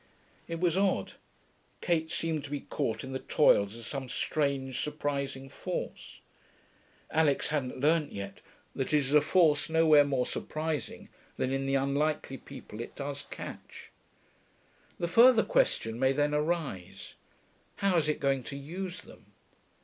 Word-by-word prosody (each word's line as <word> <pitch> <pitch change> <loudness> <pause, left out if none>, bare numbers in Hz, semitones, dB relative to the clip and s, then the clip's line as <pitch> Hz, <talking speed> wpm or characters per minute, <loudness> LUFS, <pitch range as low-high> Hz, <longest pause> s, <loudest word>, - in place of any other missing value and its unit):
It 165 0 -4
was 175 +1 +2
odd. 195 -1 +1 0.7
Kate 160 -2 0
seemed 160 -3 -2
to - - -8
be 145 -1 -3
caught 135 -7 -2
in 130 - -7
the 130 - -3
toils 105 -8 +3
of 115 - -9
some 135 0 -5
strange, 140 -4 -1
surprising 140 -2 -3
force. - - -6 0.9
Alix 155 -3 +2
hadn't 140 -4 -2
learnt 150 +1 +2
yet 100 0 -7 0.3
that 135 +2 -2
it - - +7
is 140 -1 0
a 150 - +7
force 160 -4 +3
nowhere 160 -2 +6
more 135 -3 0
surprising 155 -1 -4 0.3
than 130 - 0
in 135 0 -1
the 135 - +1
unlikely 140 0 0
people 105 +2 -9
it - - -8
does 140 0 -5
catch. - - -9 1.1
The 170 - -1
further 230 +5 +7
question - - +1
may 130 +1 +3
then 145 +1 +1
arise, 150 - -2 0.6
how 195 -2 +1
is 155 -3 +2
it 150 - 0
going 135 -1 +1
to 140 - -6
use 180 +6 -6
them? - - -16
145 Hz, 150 wpm, -30 LUFS, 135-160 Hz, 1.1 s, it